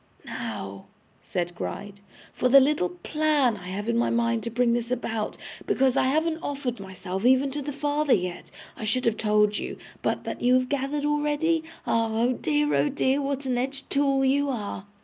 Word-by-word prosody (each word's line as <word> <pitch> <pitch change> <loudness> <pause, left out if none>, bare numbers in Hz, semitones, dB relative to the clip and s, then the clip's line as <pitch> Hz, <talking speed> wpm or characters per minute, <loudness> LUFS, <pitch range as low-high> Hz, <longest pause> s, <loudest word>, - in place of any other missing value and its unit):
'Now,' 95 0 -6 0.3
said 175 -1 -3
Gride, 200 +3 -6 0.3
'for 250 - +1
the 275 +2 +9
little 270 -9 +2
plan 285 - +1
I 180 -3 -10
have 200 +4 -4
in 235 - +1
my 240 - +2
mind 235 -1 +1
to 235 - -3
bring 235 +1 +2
this 240 0 -1
about; 225 -3 -2 0.3
because, 265 -1 +2
I 260 - +3
haven't 315 +4 +1
offered 275 - -3
myself 190 0 -6
even 260 +2 +4
to 290 +2 -3
the 290 +1 -4
father 290 0 +2
yet, 180 -3 -4 0.3
I - - -8
should 225 +4 0
have 230 -2 +2
told 210 -1 +2
you. - - -5 0.2
But - - -1
that - - -5
you 250 +1 +4
have 255 0 +1
gathered 285 +1 -1
already? 295 +2 +1 0.2
Ah! 230 0 +1
oh 235 +3 +2
dear, 295 +3 0
oh 295 - +3
dear, 275 0 +1
what 275 0 -2
an 250 -2 0
edged 270 +2 -4
tool 275 -1 +2
you 280 +2 +2
are! 205 -5 -4
255 Hz, 190 wpm, -26 LUFS, 220-285 Hz, 0.3 s, the